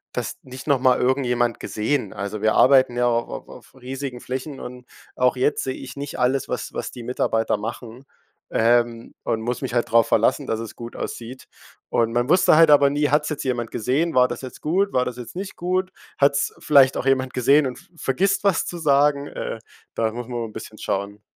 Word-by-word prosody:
das - - -3
nicht 130 +2 -10
noch 140 -3 +3
mal 130 -1 +3
irgendjemand 125 -2 +1
gesehen?“ 110 -1 -2
Also 100 0 -5
wir 110 0 +3
arbeiten 130 -2 +5
ja 125 - +2
auch 120 0 0 0.2
au - - -13
auf - - -15
riesigen 130 0 -6
Flächen 130 +2 -5
und 125 0 -9 0.3
auch 125 0 +2
jetzt 130 +3 +1
sehe 130 - -2
ich 135 +1 -9
nicht 140 0 -6
alles, 130 +1 +1
was - - -4
was - - -4
die 120 - -9
Mitarbeiter 115 -3 0
machen, 115 +3 -7 0.5
ähm, 120 0 +1
und 110 - -1
muss 120 +4 -3
mich 125 -2 -3
halt 120 - 0
drauf 115 0 +5
verlassen, 115 +6 +2
dass 110 -2 -2
es 115 -2 -7
gut 120 0 -9
aussieht. 120 +3 -7 0.4
Und 115 -1 +1
man 120 +2 0
wusste 180 -2 +5
halt 165 0 +6
aber 145 -1 +6
nie: 145 0 +1
„Hat's 150 +1 +2
jetzt 150 - -4
jemand 120 -3 -2
gesehen? 135 +9 0
War 125 0 +5
das - - -6
jetzt 130 -2 -9
gut? 190 +6 0
War 125 0 +2
das 125 -1 -5
jetzt 125 +6 -9
nicht 195 +1 -6
gut? 185 +1 -1 0.3
Hat's 140 0 +2
vielleicht 140 -3 +5
auch 135 - -3
jemand 130 -1 +1
gesehen 140 +4 +4
und 130 -1 -4
v - - -19
vergisst 190 +11 0
was 200 -4 +2
zu 175 - -5
sagen?“ 145 -2 +3
Äh, - - -5 0.4
da 110 -1 0
muss 120 +1 -6
man 120 -1 -5
immer 115 -1 -3
'n - - -16
bisschen 110 - -9
schauen. 100 +1 -3
125 Hz, 215 wpm, -22 LUFS, 120-140 Hz, 0.5 s, halt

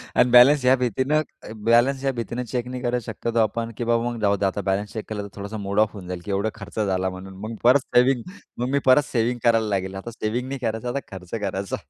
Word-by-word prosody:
आणि 125 - +4
बॅलन्स 125 +3 +7
ह्या 130 - +6
भीतीनं 130 +5 +1 0.4
बॅलन्स 125 +4 +4
ह्या 135 - +2
भीतीनं 120 +1 -4
चेक 125 -1 -2
नाही 125 0 -5
करत 120 0 0
शक्यतो 115 +1 -2
आपण 115 +1 0
की - - -2
बाबा 115 0 +1
मग 120 - -5
जाऊ 100 -1 +3
दे 100 - 0
आता 95 +1 -1
बॅलन्स 100 +2 -2
चेक 110 - -5
केला 105 -2 -4
तर - - -7
थोडासा 100 +2 -6
मूड 100 0 -2
ऑफ 110 0 +3
होऊन 95 -4 -9
जाईल, 90 -1 -5
की 100 - -4
एवढा 100 +3 0
खर्च 110 +1 -8
झाला 95 -2 0
म्हणून. 95 +1 -9
मग 110 +1 -5
परत 125 +4 +6 0.2
सेव्हिंग 125 0 +4 0.3
मग 125 +1 -2
मी 140 +1 +2
परत 135 +3 +6
सेव्हिंग 120 0 0
करायला 115 -2 +3
लागेल. 95 -1 -2
आता 95 +5 -6
सेव्हिंग 115 +3 -3
नाही 135 0 -4
करायचा 115 0 -2
आता 140 +3 -1
खर्च 90 -2 -9
करायचा. 95 -1 -2
115 Hz, 240 wpm, -23 LUFS, 100-125 Hz, 0.4 s, बॅलन्स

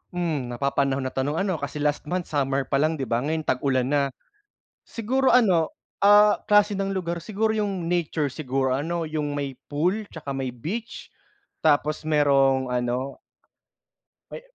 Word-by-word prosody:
Hmm, 160 -7 -1
napapanahon 135 +2 0
na 130 - -3
tanong 140 +3 -1
ano, 185 -2 -1
kasi 145 +1 -4
last 150 0 -1
month 180 +1 -3
summer 140 -2 0
pa 135 +1 0
lang 155 +2 +2
'di 140 - -4
ba 115 -2 0
ngayon 155 +4 -2
tag-ulan 130 -2 0
na. 145 -1 +3 0.8
Siguro 260 +4 0
ano, 185 -10 +4 0.3
ah, 205 +1 +7
klase 210 0 +4
ng 195 0 -1
lugar, 170 -3 -3
siguro 220 +3 0
'yung 195 -5 -2
nature 165 -3 0
siguro 130 -2 -1
ano, 165 +4 -2
'yung 150 -1 -2
may 140 -2 -3 0.2
pool 180 +9 0
'tsaka 145 -4 -6
may 135 -1 -3
beach, 210 - -6 0.6
tapos 150 0 +2
merong 140 -3 +3
ano 125 - -2 1.1
May - - -7
150 Hz, 155 wpm, -25 LUFS, 135-180 Hz, 1.1 s, ah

